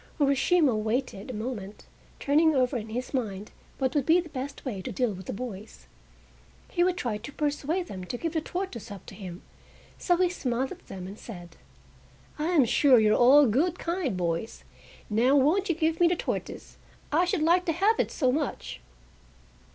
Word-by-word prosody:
Urashima 280 0 +3
waited 220 0 -2
a - - -4
moment, 215 -3 -6 0.3
turning 310 +2 +3
over 255 0 +2
in 225 -2 -4
his 245 +5 -5
mind 210 -6 -3 0.3
what 260 -2 0
would 285 -4 0
be 330 +2 +6
the 340 -2 -5
best 275 +1 -6
way 210 -8 -4
to - - -5
deal 235 +1 0
with 185 -1 -10
the - - -2
boys. 210 - -8 0.9
He 350 - +2
would 360 0 +1
try 235 -9 -2
to 235 +7 -8
persuade 300 +5 -1
them 185 - -7
to 245 - -4
give 330 +4 -3
the 320 - 0
tortoise 350 - -5
up 200 -3 -9
to - - -11
him, 185 -3 -9 0.6
so 350 -1 +2
he 365 0 +3
smiled 260 -7 -2
at - - -11
them 185 -2 -7
and 195 +3 -9
said: 175 -6 -10 0.8
"I 305 - 0
am 335 -7 +4
sure 260 +2 +5
you 215 -1 +4
are - - +4
all 280 +4 +7
good, 305 - +1
kind 335 - -2
boys! 170 +4 -3 0.4
Now 235 +6 +3
won't 320 +9 +3
you 340 - +2
give 320 0 0
me 350 - +6
the 350 - +2
tortoise? - - -5 0.3
I 335 +5 +3
should 345 -3 0
like 350 +3 +3
to 330 - +1
have 400 +7 +2
it - - +1
so 260 -5 +1
much!" 280 - -3
265 Hz, 195 wpm, -27 LUFS, 215-325 Hz, 0.9 s, all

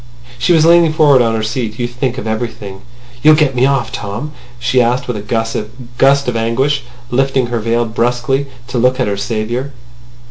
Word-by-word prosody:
She 120 - +1
was 160 -1 +4
leaning 170 -1 +5
forward 145 -4 +5
on 115 -1 +1
her 110 - -2
seat. 110 0 -3
"You 120 - -2
think 125 +1 -3
of 125 - -5
everything.... 110 -3 -5 0.4
You'll 155 0 +7
get 150 -3 +2
me 130 +1 +3
off, 135 -2 0
Tom?" 110 +9 -5 0.3
she 125 +1 +1
asked 125 +2 0
in 125 - -2
a 105 - -4
gust 115 +2 -2 0.7
of 125 - -1
anguish, 130 +5 0 0.3
lifting 135 0 +1
her 120 -1 -2
veil 115 +2 0
brusquely 125 +4 -1 0.2
to 125 - -1
look 125 +2 +2
at 125 - +2
her 100 - -1
saviour. 115 +6 -3
120 Hz, 185 wpm, -15 LUFS, 115-135 Hz, 0.7 s, You'll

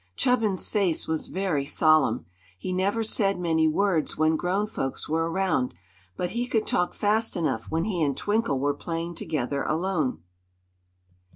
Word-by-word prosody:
Chubbins's 225 -7 +1
face 195 -6 +1
was 160 -1 -2
very 185 -7 -1
solemn. 150 -4 +3 0.3
He 185 - -4
never 200 +5 +1
said 200 -3 +2
many 160 -2 +2
words 170 0 +1
when 155 +1 +3
grown 185 +6 0
folks 135 -10 -4
were 165 +2 0
around, 165 - 0 0.4
but 180 - -2
he 240 +1 -2
could 225 -3 0
talk 180 - 0
fast 215 0 +1
enough 135 -9 -1
when 165 +1 0
he 185 -4 -2
and 140 -3 +1
Twinkle 205 -7 0
were 145 +1 +1
playing 165 +3 -4
together 140 -4 -2
alone. 155 - -1
170 Hz, 155 wpm, -26 LUFS, 155-195 Hz, 0.4 s, solemn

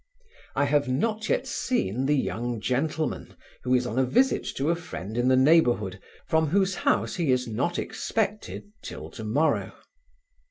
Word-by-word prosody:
I 140 - +3
have 145 0 +2
not 215 - -1
yet 260 - +1
seen 135 - -1
the 150 - +3
young 120 -3 -2
gentleman, 150 +7 -2 0.2
who 125 0 +2
is 125 0 +1
on 125 +1 -1
a - - +4
visit 250 - +2
to 145 +4 +1
a - - +2
friend 115 - -7
in 120 +1 +1
the 130 - +5
neighbourhood, 120 - +3 0.3
from 160 0 +2
whose 190 +4 +2
house 180 - 0
he 165 -6 +1
is 125 -1 +1
not 135 +10 -1
expected 210 -1 -3
'till - - -8
to 110 - -8
morrow. 140 +9 +1
140 Hz, 165 wpm, -26 LUFS, 125-175 Hz, 0.3 s, the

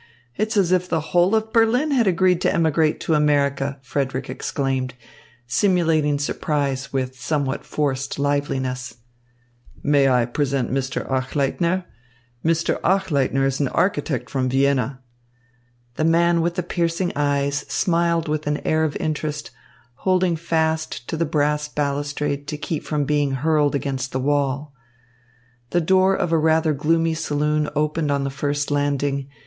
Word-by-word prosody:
It's 215 +1 -1
as 185 -3 +3
if 180 0 +1
the 165 - +1
whole 180 +4 +4
of 220 +1 -1
Berlin 240 +6 +3
had 245 -6 +3
agreed 180 -1 +3
to - - +2
emigrate 160 -1 +2
to 160 - 0
America!" 140 -2 +1
Frederick 135 0 -2
exclaimed, 130 -2 -2 0.5
simulating 155 +1 +2
surprise 140 -2 -2
with 130 -1 -3
somewhat 140 -2 -1
forced 135 -3 -2
liveliness. 130 -4 -1 0.9
"May 140 -2 +4
I 125 -2 +3
present 135 0 -1
Mr. 135 0 -2
Achleitner? 145 +7 0 0.6
Mr. 165 +1 +1
Achleitner 140 -9 +1
is 135 -1 0
an 140 - +1
architect 145 -7 0
from 130 -2 0
Vienna." 135 -1 +1 1.0
The - - 0
man 170 +1 +3
with 170 +1 -1
the 180 - -1
piercing 170 +1 -1
eyes 140 0 +1
smiled 170 -2 +1
with 155 0 -2
an 150 0 +1
air 155 0 +2
of 155 -2 -1
interest, 150 -1 -3 0.5
holding 185 -1 +2
fast 160 -5 -1
to - - -2
the 165 0 0
brass 150 0 0
balustrade 145 0 -2
to 150 - -4
keep 150 0 -3
from 150 -2 -1
being 145 -1 +1
hurled 150 +1 +2
against 135 -1 -3
the 130 - 0
wall. 140 +1 0 1.0
The 175 - +2
door 190 +3 +3
of 175 -4 -1
a 165 - +3
rather 160 0 +3
gloomy 165 +3 +1
saloon 150 -1 0
opened 150 +1 0
on 140 -1 +1
the 140 - -2
first 145 +1 -2
landing. 140 -1 0
150 Hz, 145 wpm, -22 LUFS, 140-165 Hz, 1.0 s, whole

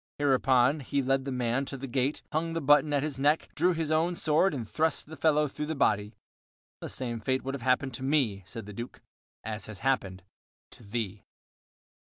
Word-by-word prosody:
Hereupon 135 0 +3
he 140 0 -1
led 135 +1 +1
the 135 - -3
man 125 +1 0
to 135 - -6
the 135 - -6
gate, 135 +2 -1
hung 165 +2 -1
the 165 - -1
button 145 0 +4
at 145 -1 +1
his 145 -3 -3
neck, 150 +3 +2
drew 180 0 +2
his 160 -2 -2
own 165 +3 +2
sword, 165 +3 +3
and 125 -7 -4
thrust 160 +6 0
the 160 - -10
fellow 150 -1 +3
through 150 +2 -5
the 160 - -2
body. 105 -5 +1 0.6
"The - - -6
same 120 -3 -3
fate 130 +4 -1
would 135 - -3
have 140 - -5
happened 130 +1 +1
to 130 - -6
me," 130 -8 +1
said 115 0 -7
the 105 - -9
Duke, 120 +4 -7 0.4
"as 110 -1 -5
has 105 -3 -9
happened 95 -9 0 0.5
to - - -13
thee." 105 -2 -4
135 Hz, 205 wpm, -29 LUFS, 120-150 Hz, 0.6 s, button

